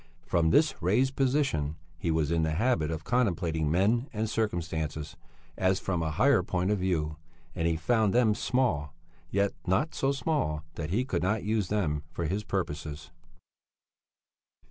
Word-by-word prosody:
From 85 Hz, -2 st, +2 dB
this 150 Hz, -, +4 dB
raised 125 Hz, +10 st, +2 dB
position 130 Hz, -, +1 dB, 0.2 s
he 85 Hz, -, -2 dB
was 80 Hz, -1 st, +1 dB
in 85 Hz, -1 st, +2 dB
the 80 Hz, -1 st, 0 dB
habit 85 Hz, -5 st, +1 dB
of 80 Hz, -1 st, -4 dB
contemplating 85 Hz, -10 st, +1 dB
men 105 Hz, -, +2 dB
and 110 Hz, 0 st, -2 dB
circumstances 80 Hz, -8 st, -2 dB, 0.4 s
as 95 Hz, 0 st, +2 dB
from 90 Hz, -3 st, -1 dB
a 80 Hz, -, -1 dB
higher 130 Hz, -, +4 dB
point 90 Hz, +1 st, -1 dB
of 105 Hz, -, +1 dB
view, 80 Hz, -5 st, -1 dB, 0.4 s
and 80 Hz, -, 0 dB
he 85 Hz, -, +1 dB
found 110 Hz, +5 st, +2 dB
them 115 Hz, -2 st, +4 dB
small; 90 Hz, -, 0 dB, 0.3 s
yet 100 Hz, 0 st, +1 dB
not 100 Hz, -, +1 dB
so 135 Hz, -, +1 dB
small 135 Hz, -, -1 dB
that 75 Hz, -2 st, -5 dB
he 115 Hz, +9 st, +1 dB
could 90 Hz, -9 st, -1 dB
not 105 Hz, +5 st, 0 dB
use 105 Hz, -2 st, 0 dB
them 85 Hz, -8 st, 0 dB
for 85 Hz, -, -2 dB
his 100 Hz, +7 st, -1 dB
purposes. 80 Hz, -4 st, -4 dB
90 Hz, 160 wpm, -29 LUFS, 80-110 Hz, 0.4 s, this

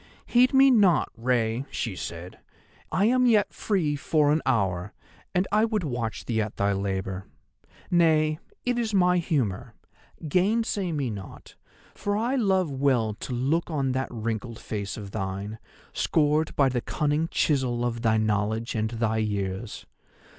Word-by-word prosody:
"'Heed 250 Hz, +1 st, +4 dB
me 270 Hz, 0 st, +6 dB
not, 195 Hz, -, +4 dB
Rei,' 120 Hz, +1 st, 0 dB
she 115 Hz, -6 st, -3 dB
said, 85 Hz, 0 st, -7 dB, 0.5 s
'I 195 Hz, -, +2 dB
am 250 Hz, +2 st, +3 dB
yet 215 Hz, -4 st, +3 dB
free 170 Hz, -9 st, 0 dB
for 145 Hz, 0 st, +2 dB
an 155 Hz, +1 st, +2 dB
hour; 95 Hz, -6 st, 0 dB, 0.4 s
and 180 Hz, +2 st, +2 dB
I 210 Hz, +1 st, +3 dB
would 220 Hz, -4 st, 0 dB
watch 120 Hz, -6 st, -3 dB
thee 110 Hz, -2 st, 0 dB
at 105 Hz, 0 st, -4 dB
thy 100 Hz, 0 st, +2 dB
labour. 95 Hz, -1 st, -3 dB, 0.6 s
Nay, 155 Hz, -3 st, +3 dB, 0.3 s
it 245 Hz, -1 st, +1 dB
is 220 Hz, -3 st, -1 dB
my 180 Hz, -1 st, +4 dB
humour; 135 Hz, -, -2 dB, 0.5 s
gainsay 195 Hz, +2 st, +1 dB
me 140 Hz, -6 st, -1 dB
not, 100 Hz, -3 st, -9 dB, 0.4 s
for 205 Hz, 0 st, -2 dB
I 235 Hz, +4 st, 0 dB
love 190 Hz, -, +2 dB
well 130 Hz, -5 st, +1 dB
to 130 Hz, -, -5 dB
look 140 Hz, +9 st, 0 dB
on 140 Hz, -5 st, 0 dB
that 130 Hz, +1 st, -2 dB
wrinkled 115 Hz, 0 st, -4 dB
face 100 Hz, -3 st, -5 dB
of 100 Hz, -2 st, -8 dB
thine, 100 Hz, +2 st, -4 dB, 0.3 s
scored 155 Hz, 0 st, +1 dB
by 140 Hz, -, +4 dB
the 125 Hz, -2 st, -1 dB
cunning 150 Hz, +4 st, 0 dB
chisel 130 Hz, -7 st, 0 dB
of 120 Hz, -1 st, -2 dB
thy 110 Hz, -2 st, +3 dB
knowledge 110 Hz, +1 st, 0 dB
and 110 Hz, -1 st, -1 dB
thy 115 Hz, -1 st, -1 dB
years. 100 Hz, 0 st, -3 dB
130 Hz, 155 wpm, -26 LUFS, 110-175 Hz, 0.6 s, me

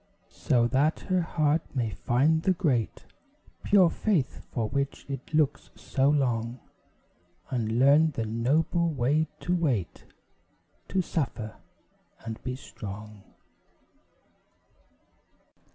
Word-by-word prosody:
So 120 Hz, -2 st, +4 dB
that 145 Hz, +5 st, +2 dB
her 185 Hz, -2 st, +1 dB
heart 155 Hz, -1 st, +1 dB
may 115 Hz, -4 st, 0 dB
find 140 Hz, +9 st, +2 dB
the 190 Hz, +2 st, +2 dB
great, 145 Hz, -, -1 dB, 0.6 s
Pure 185 Hz, -4 st, +5 dB
faith 185 Hz, -, 0 dB
for 115 Hz, -3 st, -1 dB
which 140 Hz, +3 st, -3 dB
it 135 Hz, 0 st, -6 dB
looks 150 Hz, -2 st, +1 dB
so 135 Hz, +1 st, +1 dB
long; 120 Hz, -4 st, 0 dB, 0.9 s
And 115 Hz, -3 st, -1 dB
learn 145 Hz, +5 st, +5 dB
the 120 Hz, -7 st, -3 dB
noble 150 Hz, +10 st, +1 dB
way 150 Hz, +2 st, +1 dB
to 180 Hz, -, 0 dB
wait, 135 Hz, -, -1 dB, 0.8 s
To 190 Hz, -1 st, 0 dB
suffer, 120 Hz, -10 st, -3 dB, 0.7 s
and 110 Hz, -1 st, -6 dB
be 125 Hz, 0 st, -3 dB
strong. 105 Hz, -4 st, -9 dB
135 Hz, 105 wpm, -28 LUFS, 120-160 Hz, 0.9 s, Pure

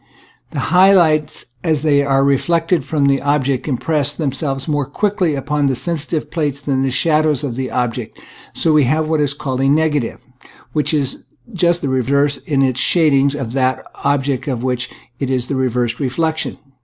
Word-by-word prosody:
The -, -, -5 dB
high 190 Hz, +2 st, +7 dB
lights 155 Hz, -4 st, +2 dB, 0.2 s
as 155 Hz, -4 st, 0 dB
they 145 Hz, -2 st, +3 dB
are 135 Hz, -1 st, +2 dB
reflected 165 Hz, +5 st, +1 dB
from 150 Hz, -3 st, 0 dB
the 140 Hz, -1 st, +2 dB
ob 145 Hz, -1 st, +1 dB
jects 135 Hz, 0 st, -1 dB
impress 145 Hz, +1 st, 0 dB
themselves 135 Hz, -2 st, -2 dB
more 145 Hz, -3 st, -1 dB
quickly 185 Hz, 0 st, 0 dB
upon 145 Hz, +1 st, -1 dB
the 135 Hz, -, +1 dB
sensitive 160 Hz, +1 st, -3 dB
plate 150 Hz, -5 st, -1 dB
than 140 Hz, -1 st, -2 dB
the 135 Hz, -, +1 dB
shadows 150 Hz, +1 st, +1 dB
of 130 Hz, -5 st, -3 dB
the 130 Hz, 0 st, -3 dB
object, 120 Hz, -2 st, -3 dB
and -, -, -18 dB, 0.3 s
so 160 Hz, -, +2 dB
we 150 Hz, -3 st, +4 dB
have 155 Hz, +4 st, +1 dB
what 160 Hz, -1 st, +1 dB
is 145 Hz, -1 st, 0 dB
called 135 Hz, -3 st, -3 dB
a 135 Hz, -, +3 dB
negative, 150 Hz, -4 st, +1 dB, 0.5 s
which 150 Hz, -1 st, 0 dB
is 145 Hz, -4 st, -1 dB, 0.3 s
just 175 Hz, -1 st, +1 dB
the -, -, 0 dB
reverse 140 Hz, +2 st, +1 dB
in 140 Hz, -3 st, 0 dB
its 130 Hz, -1 st, 0 dB
shadings 140 Hz, -3 st, +3 dB
from 130 Hz, -6 st, -4 dB
that 130 Hz, 0 st, +1 dB
of -, -, -15 dB
the -, -, -17 dB, 0.2 s
object 140 Hz, -2 st, -1 dB
of 125 Hz, -4 st, -2 dB
which 125 Hz, -1 st, -2 dB, 0.3 s
it 135 Hz, -, -2 dB
is 125 Hz, -1 st, -1 dB
a -, -, 0 dB
reversed 125 Hz, -3 st, -1 dB
re 135 Hz, -3 st, 0 dB
flection. 160 Hz, +3 st, -2 dB
140 Hz, 195 wpm, -18 LUFS, 130-155 Hz, 0.5 s, high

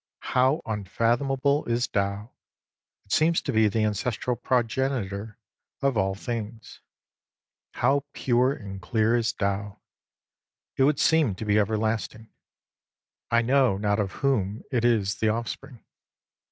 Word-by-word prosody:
How 130 Hz, +6 st, +3 dB
unfathomable 120 Hz, +7 st, 0 dB
is 120 Hz, +1 st, 0 dB
Tao! 100 Hz, +3 st, -2 dB, 0.7 s
It 100 Hz, -, -16 dB
seems 165 Hz, +2 st, +3 dB
to -, -, -2 dB
be 110 Hz, -1 st, +4 dB
the 110 Hz, +2 st, 0 dB
ancestral 120 Hz, +3 st, -1 dB
progenitor 115 Hz, -4 st, -1 dB, 0.4 s
of 140 Hz, -2 st, +1 dB
all 95 Hz, -2 st, +1 dB
things. 115 Hz, 0 st, -6 dB, 0.9 s
How 140 Hz, +1 st, +1 dB
pure 125 Hz, 0 st, +2 dB
and 100 Hz, -8 st, -7 dB
clear 110 Hz, +5 st, +1 dB
is 115 Hz, -1 st, +1 dB
Tao! 100 Hz, +1 st, -3 dB, 1.0 s
It 135 Hz, -, +3 dB
would 145 Hz, 0 st, +2 dB
seem 155 Hz, -11 st, +3 dB
to 110 Hz, -, -6 dB
be 105 Hz, -, +1 dB
everlast 110 Hz, +1 st, -1 dB
ing. 110 Hz, 0 st, -15 dB, 1.0 s
I 115 Hz, 0 st, +3 dB
know 130 Hz, -4 st, +3 dB
not 105 Hz, +1 st, 0 dB
of 100 Hz, -2 st, -1 dB
whom 110 Hz, -5 st, 0 dB
it 120 Hz, -3 st, 0 dB
is 110 Hz, -5 st, +2 dB
the 110 Hz, -, +1 dB
offspring. 120 Hz, +3 st, -5 dB
115 Hz, 130 wpm, -26 LUFS, 105-130 Hz, 1.0 s, be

